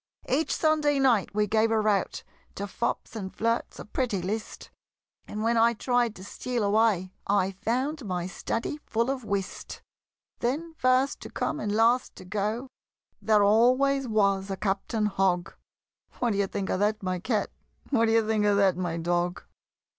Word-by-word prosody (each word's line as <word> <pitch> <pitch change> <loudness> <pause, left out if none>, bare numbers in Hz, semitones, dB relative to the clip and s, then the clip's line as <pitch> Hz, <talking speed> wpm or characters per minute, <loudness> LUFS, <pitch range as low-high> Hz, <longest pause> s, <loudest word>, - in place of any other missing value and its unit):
Each 290 +5 +1
Sunday 305 -2 +2
night 240 -8 +2
we 210 0 +3
gave 220 +2 +2
a 225 -1 +2
rout 210 -3 0 0.3
To 200 - -3
fops 215 +3 -3
and 190 -4 -5
flirts, 230 +1 -1
a - - -8
pretty 215 -2 -1
list; 210 +5 -5 0.6
And 210 +1 -4
when 230 +1 +2
I 230 +1 +5
tried 240 -1 0
to 185 - -10
steal 240 +3 -3
away, 200 -3 +2
I 195 -1 +2
found 250 +9 -2
my 180 -4 -2
study 230 +9 -3
full 235 +3 +1
of 265 -2 -4
whist! 200 -3 -4 0.6
Then, 305 +7 -2
first 255 -1 +2
to - - -9
come - - -2
and 210 - -2
last 230 +4 +2
to - - -11
go, 210 +6 -2 0.5
There 215 -2 +4
always 255 +6 +4
was 200 -3 +1
a 195 - -3
Captain 210 +3 -1
Hogg 190 -3 0 0.6
What 240 -2 +1
d'ye 200 -1 +1
think 195 -1 -3
of - - 0
that, 210 0 0
my 185 -1 -1
Cat? 215 +2 -1 0.4
What 230 -4 +3
d'ye 225 0 +3
think 215 -1 +1
of 205 -1 +3
that, 195 -2 +4
my 175 -2 -2
Dog? 175 +1 -1
215 Hz, 170 wpm, -27 LUFS, 195-240 Hz, 0.6 s, I